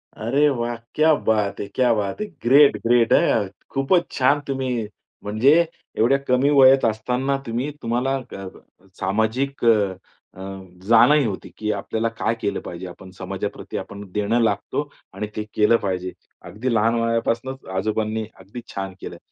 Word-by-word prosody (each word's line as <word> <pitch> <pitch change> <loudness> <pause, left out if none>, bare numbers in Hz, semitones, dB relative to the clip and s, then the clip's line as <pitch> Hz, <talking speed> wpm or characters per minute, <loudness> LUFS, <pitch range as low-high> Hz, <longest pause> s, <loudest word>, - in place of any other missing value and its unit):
अरे 135 +7 +2
वाह! 120 -3 -2 0.2
क्या 155 +1 +5
बात 105 -6 0
है! 100 - -4
क्या 125 +1 +2
बात 105 - -2
है! - - -1 0.2
ग्रेट, 140 +4 +6
ग्रेट 120 -1 +4
हं! 105 -3 +3 0.2
खूपच 135 +6 +1
छान 140 +2 +3
तुम्ही 130 -5 -2 0.4
म्हणजे 110 +8 +3 0.4
एवढ्या 120 +5 +4
कमी 130 +2 +3
वयात 135 -2 +6
असताना 125 +5 0
तुम्ही 120 +5 -2
तुम्हाला 125 +4 0
अ, 100 -7 -8 0.5
सामाजिक 110 +8 -1
अ, - - +7 0.7
अ, - - -9 0.5
जाणही 125 +6 +6
होती 100 -4 -4
की 105 0 -1
आपल्याला 110 +3 -2
काय 115 - 0
केलं 100 -3 -1
पाहिजे, 90 +1 -7
आपण 90 +1 -12
समाजाप्रती 95 +2 -5
आपण 100 0 -7
देणं 105 +4 0
लागतो 115 +7 -1 0.2
आणि 105 +2 -4
ते 105 - -2
केलं 110 +2 +4
पाहिजे. 95 -2 -2 0.3
अगदी 120 +4 -3
लहान 115 +1 +2
वयापासनंच 115 +3 -1
आजोबांनी 110 +2 -1
अगदी 100 +6 -9
छान 95 -1 -4
केलं - - -7
115 Hz, 150 wpm, -22 LUFS, 105-130 Hz, 0.7 s, अ